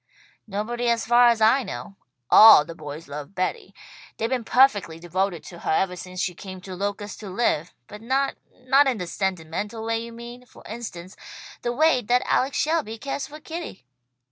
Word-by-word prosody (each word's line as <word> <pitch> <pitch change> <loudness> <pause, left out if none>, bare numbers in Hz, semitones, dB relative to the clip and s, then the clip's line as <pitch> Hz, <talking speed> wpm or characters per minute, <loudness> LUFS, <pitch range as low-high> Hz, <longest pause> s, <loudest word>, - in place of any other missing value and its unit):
"Nobody 235 +4 -2
as 230 -1 +1
far 240 +1 +6
as 230 -2 +1
I 225 +5 +5
know. 195 - -7 0.4
All 215 -9 +9
the 165 - -8
boys 155 0 -9
love 145 +6 -8
Betty. 185 +1 -3 0.4
They've 225 - -1
been 255 -2 0
perfectly 215 -10 +3
devoted 175 +1 -2
to 175 - -11
her - - -5
ever 180 +3 +1
since 185 0 -8
she 185 -1 -1
came 185 +1 -9
to 190 0 -9
Locust 205 +1 -4
to 210 - -8
live; 185 -5 -1
but 210 - -11
not 270 +4 0 0.3
not 270 +2 +4
in 255 -4 +1
the 180 - -4
sentimental 190 +4 -3
way 225 0 0
you 235 - -9
mean; 240 +2 -11
for - - -17
instance 200 -6 -8 0.5
the 240 - -1
way 300 0 +3
that 245 +3 +1
Alex 265 +2 +1
Shelby 305 -8 0
cares 275 +3 -4
for 300 +1 -11
Kitty." 320 - -8
215 Hz, 185 wpm, -24 LUFS, 185-245 Hz, 0.5 s, All